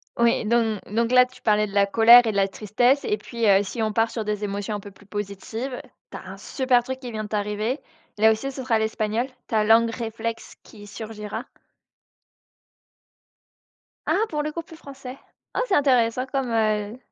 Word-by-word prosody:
Oui, 235 -1 +2
don 225 -2 +1
donc 230 +2 0
là, 250 0 +7
tu 255 0 -18
parlais 210 -1 +3
de 200 - -11
la 200 -1 +4
colère 230 +4 +7
et 220 - +1
de - - -8
la 195 -1 +3
tristesse 230 +7 +1
et 210 - 0
puis, 230 +2 -4
heu, 195 -1 +6
si 225 +3 -4
on 215 -1 -1
part 225 +1 +2
sur 220 -3 -4
des 210 0 -2
émotions 205 +1 -3
un 205 - -4
peu 205 - -10
plus 200 +1 -20
positives, 210 +5 -5 0.3
tu - - -6
as - - -11
un - - -9
super 255 -3 +1
truc 260 +1 -5
qui 250 -2 -7
vient 215 -1 -4
de 210 - -10
t'arriver. 210 +5 -2 0.4
Là, 220 +1 +5
aussi, 270 +5 -2
ce 265 -1 -7
sera 230 -3 +1
l'espagnol, 220 +2 -1 0.2
ta 215 -2 +1
langue 230 +1 +4
réflexe 230 -1 -5
qui 205 -2 -14
surgira? 210 -1 -7 2.6
Ah! - - +1
Pour 300 -1 -2
le 305 - -3
coup, 335 - -4
plus 330 0 -14
français, 270 -3 -10 0.4
oh, - - 0
c'est 385 - -1
intéressant 255 -3 +2
comme 265 -2 -2
heu 215 0 0
225 Hz, 195 wpm, -24 LUFS, 210-250 Hz, 2.6 s, là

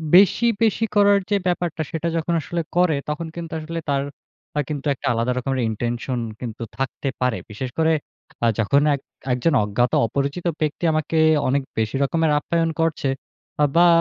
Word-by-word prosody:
বেশি, 200 +5 +6 0.2
বেশি 225 0 +2
করার 205 -1 +6
যে 205 - +3
ব্যাপারটা 175 -2 -1
সেটা 165 +1 -2
যখন 165 +1 -1
আসলে 170 +2 -2
করে, 175 -3 +4
তখন 155 +2 -3
কিন্তু 170 -1 -6
আসলে 165 +2 -4
তার 140 -1 +2 0.6
আ - - +3
কিন্তু 145 -2 -4
একটা 135 - -5
আলাদা 115 +2 0
রকমের 130 +1 -1
intention 120 +3 -2 0.2
কিন্তু 120 -1 -6
থাকতে 135 +1 -2
পারে। 125 -2 +1
বিশেষ 115 +5 -5
করে 160 0 +3 0.5
আ - - +5
যখন 140 +7 +3
এক 140 - -9 0.3
একজন 135 +6 +1
অজ্ঞাত 110 +4 +1 0.2
অপরিচিত 140 +8 -2 0.2
ব্যক্তি 155 +2 -1
আমাকে 155 +1 0 0.3
অনেক 140 +2 +2 0.2
বেশি 110 +1 0
রকমের 160 +2 +1
আপ্যায়ন 165 +2 0
করছে, 160 -4 +1 0.5
আ - - +6
বা 175 +1 +7
150 Hz, 165 wpm, -22 LUFS, 125-165 Hz, 0.6 s, বা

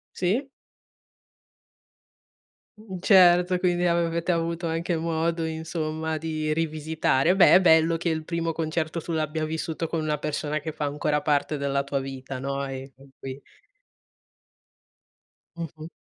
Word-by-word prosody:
Sì. 220 +10 0 2.3
Mh, 195 -4 -8
certo, 180 -1 +5
quindi 180 -1 +1
avete 170 0 +1
avuto 170 0 -1
anche 165 +1 -1
modo 165 0 -1
insomma 160 0 -3
di 155 -1 -2
rivisitare. 155 0 +1
Beh, 190 - +7
è 190 - +6
bello 165 -1 +4
che 175 - -2
il 160 -1 -1
primo 165 0 -2
concerto 160 0 -2
tu 170 - -5
l'abbia 155 0 -1
vissuto 160 +1 -3
con 165 - -2
una 155 -1 -1
persona 150 0 -2
che 155 +1 -5
fa 150 - -3
ancora 150 +1 0
parte 150 0 0
della 140 0 0
tua 140 0 -2
vita, 135 -1 -6
no, 140 +1 -3
e 135 0 -7
con 135 +1 -18
cui 135 +1 -8 2.1
Mh-mh. 160 -1 -7
160 Hz, 135 wpm, -25 LUFS, 150-170 Hz, 2.3 s, Beh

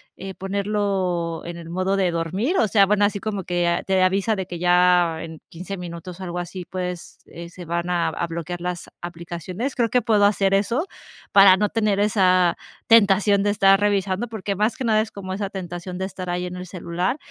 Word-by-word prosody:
eh, 190 +1 -7
ponerlo 195 -4 -2
en 170 0 -6
el 165 -1 -10
modo 185 +3 0
de 185 -2 +1
dormir. 185 - -1
O 220 - +3
sea, 200 -1 +5
bueno, 205 +1 +2
así 205 0 -1
como 205 -2 -4
que, 175 0 0
ah, 170 0 0
te 190 -1 +1
avisa 195 +4 +2
de 190 - -3
que 175 -1 -7
ya 180 -2 +3
en 160 -1 -9
15 185 +4 -7
minutos 175 0 -8
o - - -7
algo 175 -1 -4
así, 180 +1 -6
pues, 180 -1 -6
eh, 170 0 -10
se 175 +1 -11
van 170 +1 -2
a 175 -1 +1
a 170 - -3
bloquear 170 +1 -5
las 180 -1 -4
aplicaciones. 175 - -5
Creo 235 -3 +1
que 250 +3 +2
puedo 215 -2 +2
hacer 195 -1 +2
eso, 235 - +1 0.5
para 195 -2 +8
no 210 +1 +2
tener 210 -3 0
esa 185 -4 +3 0.3
tentación 205 -2 +5
de 205 - +1
estar 195 -1 +5
revisando, 200 +1 0
porque 205 -3 -4
más 215 +8 0
que 265 - -4
nada 215 -2 +3
es 220 0 -5
como 185 -2 -6
esa 200 0 -3
tentación 180 -1 -6
de 190 - -2
estar 185 -1 -7
ahí 175 0 -2
en 180 0 -6
el 180 0 -7
celular 180 - -2
185 Hz, 210 wpm, -22 LUFS, 175-205 Hz, 0.5 s, para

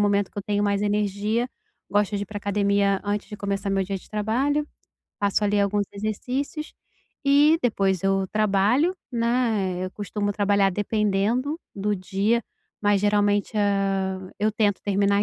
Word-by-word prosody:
momento 205 -1 +2
que - - -8
eu - - -3
tenho 205 +1 0
mais 200 -1 +1
energia. 210 +3 0 0.4
Gosto 205 +1 +1
de 200 - -2
ir - - -5
pra 205 +2 -8
academia 200 -1 +1
antes 205 0 -2
de 210 - -7
começar 200 0 -2
meu 195 0 +1
dia 195 +1 -3
de - - -12
trabalho, 255 +8 0 0.5
faço, 205 +1 +1
ali, 205 0 +2
alguns 200 +1 +1
exercícios, 250 +9 -3 0.5
e 290 +3 +5
depois 195 -6 +1
eu 195 0 +1
trabalho, 215 - +3 0.2
né, 230 -7 0
eu 185 - -4
costumo 205 0 -2
trabalhar 200 -1 +2
dependendo, 210 - 0 0.2
do 205 +1 0
dia, 200 +5 0 0.4
mas 205 -1 +3
geralmente, 205 0 +2
hã, 195 -2 0
eu 215 +1 +1
tento 205 -2 0
terminar 200 0 +2
205 Hz, 155 wpm, -24 LUFS, 200-215 Hz, 0.5 s, e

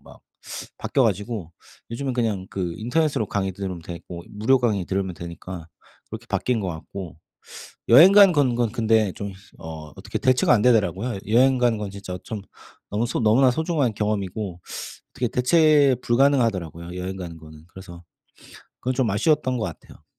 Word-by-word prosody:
막 - - -16 0.6
바뀌어 135 - +1
가지고 105 -4 -2 0.4
요즘은 130 +3 -3
그냥 110 -6 -1
그 90 -3 -3
인터넷으로 135 +2 0
강의 95 -2 -2
들으면 95 -2 -5
되고 85 +1 -8
무료 110 +6 +2
강의 110 -6 +1
들으면 95 -1 -2
되니까 85 0 -8 0.4
그렇게 - - -8
바뀐 125 -2 0
것 95 - -3
같고 85 +1 -7 0.7
여행 160 +11 +9
가는 200 -2 +8
건 135 -5 +2
건 120 -2 0
근데 110 -4 +2
좀 100 -1 -6 0.3
어 80 -1 -9
어떻게 - - -5
대체가 130 -1 +3
안 115 - +4
되더라고요. 110 -1 +2
여행 130 +4 +4
가는 120 -3 +2
건 105 -2 -4
진짜 95 -2 -7
좀 105 -3 -6 0.5
너무 110 +4 0
소 - - -2
너무나 120 +4 +4
소중한 150 -3 0
경험이고 100 -3 -3 0.5
어떻게 125 -2 -2
대체 145 +1 +4
불가능하더라고요 110 - +1
여행 95 +1 -4
가는 85 -3 -7
거는. 80 -1 -14
그래서 90 -2 -12 0.8
그건 130 +1 -1
좀 125 -4 +1
아쉬웠던 130 +4 +1
것 110 - -1
같아요. 85 -6 -10
105 Hz, 355 characters per minute, -23 LUFS, 90-125 Hz, 0.8 s, 여행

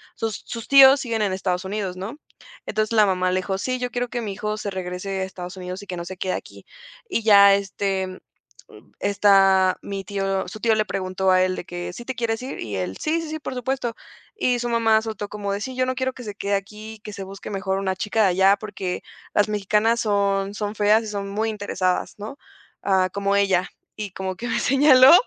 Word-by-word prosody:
Sus 225 -2 -3
sus 230 -2 -6
tíos 275 0 +8
siguen 230 -4 -2
en 200 -3 +1
Estados 185 -1 -1
Unidos, 195 -2 -3
¿no? 205 +9 -6 0.5
Entonces, 215 +1 -1
la 215 -2 +6
mamá 185 -1 +1
le 185 - +1
dijo: 190 +1 -2
"Sí, 255 +4 -2
yo 250 0 -2
quiero 245 0 -2
que 240 +1 -3
mi 210 -3 -4
hijo 210 +2 -3
se 210 - -4
regrese 190 +1 -4
a - - 0
Estados 180 -1 -8
Unidos 185 +1 -6
y - - -13
que 180 - -5
no 170 - -4
se 190 +1 -7
quede 185 0 -2
aquí". - - -8 0.4
Y 230 - -1
ya, 200 -2 +8
este, 195 -1 -2 0.6
mm, - - -17
esta 195 -2 +4
mi 195 -1 -5
tío 195 0 -1
su 215 +4 -8
tío 225 0 +3
le 215 0 +1
preguntó 190 0 -1
a 185 0 +5
él 185 0 -1
de - - -6
que: 175 0 -6
"¿Sí 240 - -9
te 260 - -4
quieres 230 -1 -1
ir?", 260 - -6
y 105 -3 -4
él: 95 0 -3
"Sí, 325 +2 0
sí, 325 - -6
sí, 315 - -3
por 275 - -5
supuesto", 250 -1 -2 0.4
y 250 - +1
su 240 - -2
mamá 225 -2 +3
soltó 215 -2 -5
como 205 -1 -4
de: 200 - -2
"Sí, 260 +4 -5
yo 255 - +2
no 255 - -1
quiero 260 0 -1
que 250 - -9
se 210 -2 -6
quede 200 -1 -1
aquí, 210 +2 -5
y - - -15
que 210 0 -9
se 195 -1 -6
busque, 195 +1 -9
mejor, 195 -1 -1
una 190 -1 -1
chica 215 +2 0
de 200 - +5
allá, 190 +2 +4
porque 200 -3 -5 0.3
las 205 - +3
mexicanas 210 +3 +1
son 200 -1 +1
son 210 0 -3
feas 210 +2 +4
y - - -6
son 200 -1 -4
muy 220 +3 -1
interesadas", 205 -3 -1
¿no?, 215 +7 -7 0.4
ah: 190 -2 +2
"Como 200 0 0
ella". 190 -2 +2 0.3
Y 205 -3 -5
como 190 0 -4
que 235 - -6
me 235 0 0
señaló, 270 0 +7
200 Hz, 235 wpm, -23 LUFS, 190-225 Hz, 0.6 s, tíos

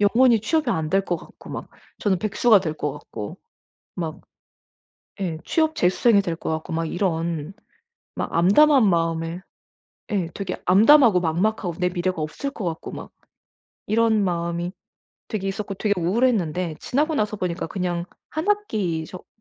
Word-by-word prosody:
영원히 230 +3 +5
취업이 315 +8 +1
안 160 -1 -1
될 195 +1 +2
것 175 - -1
같고 - - -14
막 - - -6 0.3
저는 195 -3 +1
백수가 215 0 +4
될 160 -4 -3
것 150 -2 -3
같고 105 -1 -8 0.6
막 160 -2 -4 1.0
예 170 -4 -2
취업 315 -1 +1
재수생이 200 +4 +4
될 170 -4 -3
것 - - -5
같고 160 +1 -4
막 165 0 -1
이런 170 -2 -1 0.6
막 - - -4
암담한 220 - +5
마음에 165 0 0 0.7
예 190 -5 0
되게 200 - -4
암담하고 220 +2 +6
막막하고 180 +3 0
내 180 0 +2
미래가 180 -1 -2
없을 160 - -4
것 220 -8 -6
같고 165 -2 -4
막 - - -8 0.8
이런 220 -1 +3
마음이 170 0 -2 0.6
되게 205 -4 -3
있었고 195 +1 -4
되게 205 +2 0
우울했는데 180 -5 +1
지나고 305 +5 0
나서 215 -5 0
보니까 180 -2 -2
그냥 175 -3 -2 0.3
1 315 +5 -3
학기 215 - 0
속 185 - -11
185 Hz, 290 characters per minute, -23 LUFS, 170-220 Hz, 1.0 s, 암담하고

